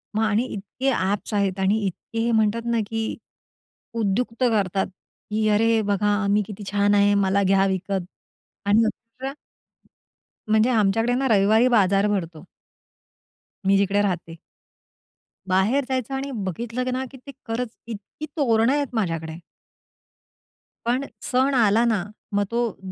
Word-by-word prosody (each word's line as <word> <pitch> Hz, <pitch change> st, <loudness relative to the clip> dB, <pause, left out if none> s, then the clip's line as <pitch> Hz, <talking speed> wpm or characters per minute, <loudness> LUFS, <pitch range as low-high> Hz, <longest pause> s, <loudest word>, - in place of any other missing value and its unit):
मग 220 Hz, -, +2 dB
आणि 220 Hz, +3 st, +2 dB
इतके 215 Hz, +7 st, -3 dB
ॲप्स 205 Hz, -1 st, -1 dB
आहेत 200 Hz, -2 st, 0 dB
आणि 195 Hz, +3 st, +2 dB
इतके 210 Hz, +5 st, -6 dB
हे 235 Hz, +1 st, +1 dB
म्हणतात 220 Hz, 0 st, +2 dB
ना, 235 Hz, -1 st, +1 dB
की 225 Hz, 0 st, -3 dB, 0.8 s
उद्युक्त 230 Hz, +3 st, -1 dB
करतात, 200 Hz, -5 st, +1 dB, 0.4 s
की 215 Hz, 0 st, +1 dB
"अरे, 225 Hz, +2 st, +3 dB
बघा, 205 Hz, 0 st, +1 dB
मी 205 Hz, +1 st, +3 dB
किती 210 Hz, -1 st, -8 dB
छान 205 Hz, 0 st, +3 dB
आहे, 205 Hz, 0 st, +4 dB
मला 200 Hz, 0 st, +2 dB
घ्या 195 Hz, 0 st, +3 dB
विकत." 190 Hz, +1 st, -1 dB, 0.7 s
आणि 215 Hz, +3 st, +5 dB
खूप 230 Hz, +2 st, -16 dB
वेळा 270 Hz, +1 st, -2 dB, 1.1 s
म्हणजे, 215 Hz, +2 st, +3 dB
आमच्याकडे 225 Hz, +1 st, +2 dB
ना 265 Hz, +2 st, +1 dB
रविवारी 220 Hz, +2 st, +4 dB
बाजार 200 Hz, -4 st, +3 dB
भरतो 170 Hz, -6 st, -3 dB, 1.2 s
मी 195 Hz, +1 st, +4 dB
जिकडे 200 Hz, +1 st, +2 dB
राहते. 170 Hz, -4 st, -3 dB, 1.1 s
बाहेर 195 Hz, +9 st, +2 dB
जायचं 260 Hz, 0 st, -2 dB
आणि 275 Hz, +1 st, -4 dB
बघितलं 235 Hz, +7 st, -3 dB
ना, 260 Hz, +1 st, -2 dB
की 270 Hz, -, -11 dB
ते 270 Hz, +2 st, -11 dB, 0.2 s
खरंच 230 Hz, +1 st, -3 dB
इतकी 225 Hz, +7 st, -7 dB
तोरणं 235 Hz, -3 st, +3 dB
आहेत 290 Hz, -1 st, 0 dB
माझ्याकडे 165 Hz, -6 st, -2 dB, 1.5 s
पण 250 Hz, +4 st, 0 dB, 0.2 s
सण 260 Hz, +2 st, +1 dB
आला 225 Hz, -2 st, +4 dB
ना, 220 Hz, -6 st, +1 dB, 0.3 s
मग 205 Hz, 0 st, +2 dB
तो 235 Hz, -2 st, -1 dB
215 Hz, 140 wpm, -23 LUFS, 195-235 Hz, 1.5 s, आणि